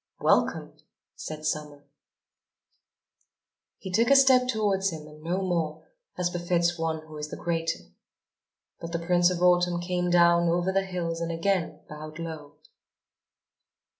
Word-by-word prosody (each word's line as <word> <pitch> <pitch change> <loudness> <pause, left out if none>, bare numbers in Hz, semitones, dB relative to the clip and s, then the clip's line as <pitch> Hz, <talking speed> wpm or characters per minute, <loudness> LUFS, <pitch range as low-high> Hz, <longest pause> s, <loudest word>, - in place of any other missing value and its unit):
"Welcome!" - - +1 0.4
said 155 0 -7
Summer. 150 -2 -3 1.9
He 190 - -8
took 230 +5 +2
a 275 - +7
step 260 -2 +6
towards 205 -5 +1
him 160 -3 -7
and 155 0 -14
no 180 +4 -2
more, 165 -4 -2 0.3
as 175 -1 0
befits 175 0 0
one 160 -1 -3
who 155 -1 -11
is 150 - -4
the - - -7
greater. 165 -1 -2 1.0
But 165 0 -7
the 170 0 -3
Prince 175 0 +4
of 180 -1 -2
Autumn 175 -1 +3
came 180 0 -1
down 170 -1 +4
over 175 +2 +1
the 195 0 +1
hills 170 -2 -3
and 170 0 -2
again 175 +1 -1
bowed 155 +1 -9
low. 160 -3 -7
170 Hz, 140 wpm, -27 LUFS, 160-180 Hz, 1.9 s, a